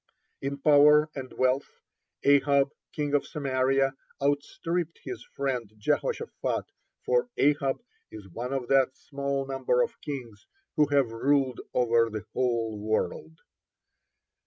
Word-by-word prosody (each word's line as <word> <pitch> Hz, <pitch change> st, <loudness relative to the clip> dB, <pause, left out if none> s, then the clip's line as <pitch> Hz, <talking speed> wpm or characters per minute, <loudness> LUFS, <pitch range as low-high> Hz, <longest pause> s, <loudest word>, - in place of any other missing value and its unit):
(30) 135 Hz, -, -2 dB
In -, -, -6 dB
power 150 Hz, +1 st, +6 dB
and 130 Hz, -2 st, -7 dB
wealth, 130 Hz, +2 st, 0 dB, 0.4 s
Ahab, 140 Hz, 0 st, +4 dB, 0.2 s
king 145 Hz, -1 st, -2 dB
of 145 Hz, -, +2 dB
Samaria, 135 Hz, -1 st, +1 dB, 0.3 s
outstripped 155 Hz, +4 st, -1 dB
his 125 Hz, -3 st, -6 dB
friend 125 Hz, -6 st, -2 dB
Jehoshaphat, 455 Hz, -, -1 dB, 0.4 s
for 485 Hz, -, +2 dB
Ahab 140 Hz, -1 st, +2 dB, 0.4 s
is 105 Hz, -3 st, -10 dB
one 120 Hz, +8 st, -5 dB
of 135 Hz, -3 st, -2 dB
that 135 Hz, -1 st, +3 dB
small 140 Hz, -1 st, -3 dB
number 130 Hz, -2 st, +1 dB
of -, -, -6 dB
kings 120 Hz, -7 st, -7 dB, 0.3 s
who 150 Hz, -1 st, +4 dB
have 140 Hz, -5 st, +2 dB
ruled 135 Hz, +1 st, +1 dB
over 115 Hz, -2 st, +3 dB
the 110 Hz, -3 st, -6 dB
whole 115 Hz, -4 st, 0 dB
world. 105 Hz, -7 st, -2 dB
135 Hz, 125 wpm, -28 LUFS, 125-145 Hz, 0.4 s, power